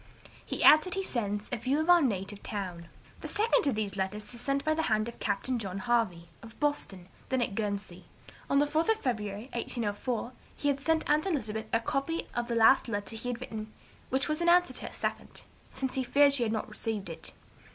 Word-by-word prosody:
He - - -3
adds 310 0 +9
that 365 - -3
he 390 - -1
sends 210 - -2
'a 245 - 0
view 260 +6 0
of 315 - 0
our 350 -1 +7
native 205 -5 -1
town.' 180 -5 -5 0.3
"The - - -6
second 450 -1 +2
of 265 - +2
these 210 -2 -2
letters 200 +4 -3
is 240 - -8
sent 275 +2 -1
by 310 - +3
the 320 - 0
hand 215 0 +2
of 235 - -8
Captain 235 +5 -1
John 195 -3 -4
Harvey, 210 -7 0
of 225 -1 -13
Boston, 205 -11 -1 0.2
then 260 - +1
at 235 -4 -1
Guernsey. 200 -4 -3 0.4
On 275 - +3
the 290 - +5
4th 310 +6 0
of 445 -1 +3
February, 215 - -3
1804, 235 +1 -2 0.2
he 290 - 0
had 275 -1 0
sent 320 +2 +1
aunt 300 +4 +2
Elizabeth 220 - -2
a 230 - +3
copy 290 +6 -1
of 240 0 -2
the 235 - -1
last 230 +4 +6
letter 205 0 -3
he 225 +3 -6
had 240 -1 -3
written 215 -3 -6 0.4
(which 265 0 +1
was 305 +2 -1
in 345 - +3
answer 355 0 +5
to - - -6
her - - -7
second), - - -4 0.3
since 265 0 -4
he 265 - 0
feared 280 +3 +5
she 275 - +3
had 225 -2 +1
not 220 -1 -2
received 215 -4 -3
it. 165 - -7
240 Hz, 220 wpm, -30 LUFS, 210-285 Hz, 0.4 s, adds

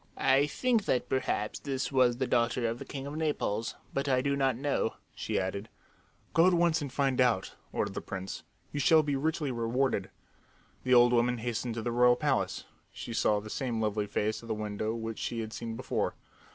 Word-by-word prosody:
"I 135 +2 +4
think 235 - +1
that 125 -1 0
perhaps 120 -5 -1
this 135 -1 -3
was 125 -3 +4
the 130 - 0
daughter 120 0 +1
of 115 +1 -3
the - - -7
king 135 -1 -6
of 145 +1 -6
Naples, 145 -9 -1 0.2
but 140 0 -1
I 130 -1 +3
do 140 +1 +1
not 135 -2 +2
know," 140 -4 0 0.2
she - - -2
added. 100 +3 -3 0.6
"Go 165 +3 +6
at 185 - +4
once 170 -2 +3
and 140 -3 -4
find 135 -1 +1
out," 115 -7 +2 0.2
ordered - - -1
the - - -4
prince. 95 0 -6 0.3
"You 145 - -3
shall 155 +3 +5
be 145 -1 0
richly 150 0 -1
rewarded." 115 -3 0 0.7
The 125 0 +4
old 120 0 +6
woman 120 +1 +3
hastened 115 0 -3
to 115 - -3
the 120 - -1
royal 120 +1 +5
palace. 140 0 0 0.3
She 115 - -7
saw 105 -2 +2
the 110 +1 -9
same 120 -4 -2
lovely 105 -1 0
face 105 +1 -1
at 115 - -12
the 110 - -1
window 110 +1 -3
which 115 -1 -5
she 115 -1 -2
had 110 0 -6
seen 115 0 -5
before. 130 +3 -2
125 Hz, 205 wpm, -30 LUFS, 115-140 Hz, 0.7 s, Go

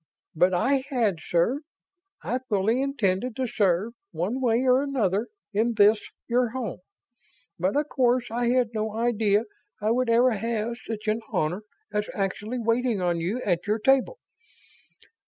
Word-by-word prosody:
"But 180 +3 +3
I 265 +8 +2
had, 225 - +1
sir. 175 +11 +1 0.6
I 250 - -1
fully 215 +4 +2
intended 240 -4 0
to 260 - -1
serve, 205 -2 +1 0.2
one 215 +10 -2
way 240 0 +2
or 255 +1 +5
another, 230 -7 0 0.3
in 225 +3 +1
this 210 0 +5 0.3
your 245 0 +2
home. 235 -6 -4 0.8
But 185 +6 0
of 295 +1 +1
course 245 -2 +1
I 240 +1 0
had 245 -1 +2
no 215 -1 -2
idea 220 -2 +2 0.4
I 215 +1 +1
would 250 +1 +1
ever 240 +2 +5
have 230 +1 -2
such 220 -1 -5
an 215 +2 +1
honor 180 0 0 0.3
as 210 0 -1
actually 205 +4 -2
waiting 230 -1 +1
on 175 -2 0
you 200 +10 -2
at 180 -1 0
your 210 +1 +2
table. 270 - +2
225 Hz, 155 wpm, -26 LUFS, 205-250 Hz, 0.8 s, or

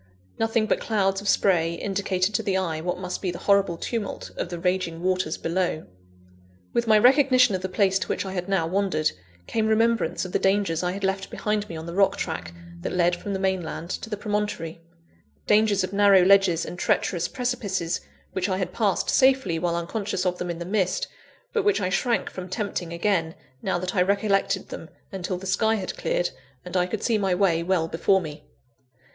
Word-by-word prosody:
Nothing 225 0 +2
but - - +1
clouds 195 -3 0
of 200 - -2
spray 170 -4 +3
indicated 195 +1 -1
to - - +1
the 190 -2 0
eye, 165 -4 -2
what 180 +2 -2
must 180 0 -5
be 185 - -1
the 175 - -4
horrible 195 -4 +2
tumult 220 +2 -4
of - - -3
the 175 - -5
raging 175 -1 -1
waters 185 -3 0
below. 170 -2 -1 0.9
With 235 0 +1
my 215 -1 +6
recognition 255 -1 +5
of 185 - -1
the 190 - -3
place 190 0 +2
to 185 - -3
which - - -2
I 190 - -5
had 180 0 -4
now 190 -4 +2
wandered, 175 -3 0 0.3
came 220 -1 0
remembrance 220 -5 +1
of 185 - -7
the - - +1
dangers 195 -4 +1
I 180 0 -1
had 195 +1 -6
left 195 0 -1
behind 210 -1 -2
me 170 - -6
on 160 - -7
the 170 - -6
rock 195 +1 +3
track 160 0 -4 0.3
that 175 - -4
led 175 -1 +3
from 200 +3 -5
the 190 - -2
mainland 180 -3 -2
to 225 - -5
the 210 - -3
promontory 205 -6 -3 0.6
dangers 210 -2 +3
of 185 - -4
narrow 200 -2 +6
ledges 195 -4 +4
and 180 - -7
treacherous 175 -1 +1
precipices, 200 -9 -2 0.3
which 190 +1 -1
I 185 - 0
had 180 -2 -3
passed 205 -3 +1
safely, 260 -11 +3
while 170 0 0
unconscious 190 +2 -2
of 180 -1 0
them 180 - -3
in 170 - -3
the 170 - -6
mist, 190 -1 0 0.5
but 450 -4 +1
which 415 - +3
I 185 -2 0
shrank 235 +5 0
from 185 0 -7
tempting 190 -4 -3
again, 170 -2 0 0.3
now 190 - 0
that 185 +1 -3
I 180 - +3
recollected 200 +1 +1
them, - - -8 0.2
until 185 -1 -3
the 190 - -9
sky 220 +4 +2
had 190 -4 -4
cleared, 175 - -1 0.3
and 180 - -7
I 180 -1 +2
could 210 +2 -4
see 225 -3 +2
my 190 -3 +1
way 180 -3 +2
well 170 -2 +1
before 190 +4 +2
me. 150 -4 -8
190 Hz, 205 wpm, -25 LUFS, 175-205 Hz, 0.9 s, my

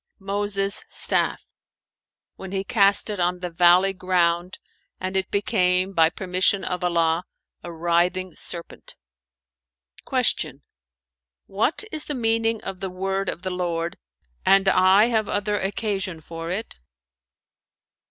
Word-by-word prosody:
"Moses' 200 0 -2
staff,[FN#440] - - 0 0.9
when 190 -1 -8
he 195 0 -1
cast 200 0 +3
it 205 - -5
on 180 +1 +1
the 180 -1 -4
valley 180 +3 +5
ground 180 -1 0 0.4
and 185 +1 -4
it 190 0 0
became, 185 -1 +1
by 165 -2 +4
permission 185 +2 0
of 180 -1 -3
Allah, 170 -1 +1 0.4
a 175 - -8
writhing 175 +2 0
serpent." 170 -1 -4 1.1
Q - - +1 0.8
"What 220 - 0
is 310 -1 0
the 295 - -3
meaning 225 -2 0
of 190 -1 -6
the 190 - -4
word 190 +1 -2
of 175 - -6
the 185 - -3
Lord, 170 -2 -3 0.4
'And 195 0 +4
I 190 +2 +5
have 220 -3 0
other 205 0 -1
occasion 195 -3 -2
for 165 +1 -8
it?'" 195 - -5
185 Hz, 125 wpm, -23 LUFS, 175-200 Hz, 1.1 s, valley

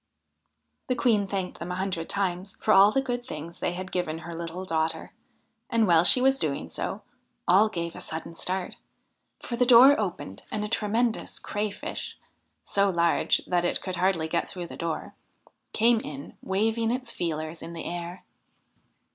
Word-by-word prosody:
The 255 - +1
Queen 225 -4 +2
thanked 190 -2 -3
them 175 +1 -5
a - - -2
hundred 185 -3 -3
times 190 -1 -2
for 215 - +3
all 195 +2 +8
the 270 +4 +1
good 245 -2 -2
things 170 -7 -8
they 175 - -1
had 185 +1 -6
given 170 -3 -1
her 170 - -6
little 170 +2 -5
daughter, 160 -2 -1 0.6
and, 230 -1 +3
while 170 -3 +5
she 250 - +6
was 270 +1 +3
doing 150 -4 -2
so, - - -4 0.4
all 200 +5 +5
gave 170 -4 -4
a - - -8
sudden 165 +1 -6
start, 185 +1 -3 0.6
for 240 - -4
the 245 - +3
door 250 +3 +8
opened 175 - -4
and 210 0 -1
a - - -3
tremendous 225 +2 0
Crayfish 210 -1 -4 0.5
so 200 0 +2
large 170 -2 +2
that 175 -1 +1
it 175 - 0
could 185 -2 -4
hardly 180 -3 +1
get 170 +1 -1
through 180 -3 -5
the - - -9
door 165 -2 -4 0.6
came 230 +1 +4
in, 145 -8 -8
waving 225 +4 0
its 250 0 -1
feelers 155 -1 -3
in 170 - -7
the 165 - -6
air. 175 +1 -5
185 Hz, 170 wpm, -27 LUFS, 170-220 Hz, 0.6 s, all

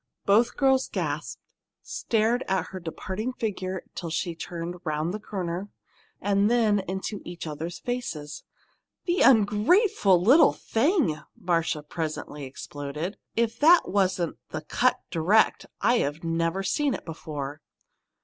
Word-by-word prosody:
Both 225 +5 +3
girls 265 -1 +3
gasped, - - -3 0.4
stared 230 +3 0
at 190 -1 0
her 190 - -6
departing 190 +7 -4
figure 190 -5 -3
till 170 - -5
she 170 +2 -2
turned 170 +1 -5
the 170 +2 -3
corner, 190 -2 -4 0.5
and 200 +1 +2
then 225 -4 +3
into 190 +2 -4
each 175 -1 -7
other's 160 +3 -5
faces. 165 -12 -5 0.6
"The 350 0 +1
ungrateful 215 - +4
little 265 - +6
thing!" 250 - +1 0.2
Marcia 165 -3 0
presently 150 -2 -5
exploded. 145 +6 -6 0.2
"If 230 0 0
that 330 +4 +6
wasn't 185 -3 +1
the 155 - -4
'cut 245 +11 +1
direct,' 180 +6 +3
I've 165 -11 +1
never 165 +3 0
seen 280 +7 +1
it - - -9
before!" 150 -3 -6
190 Hz, 120 wpm, -26 LUFS, 165-230 Hz, 0.6 s, little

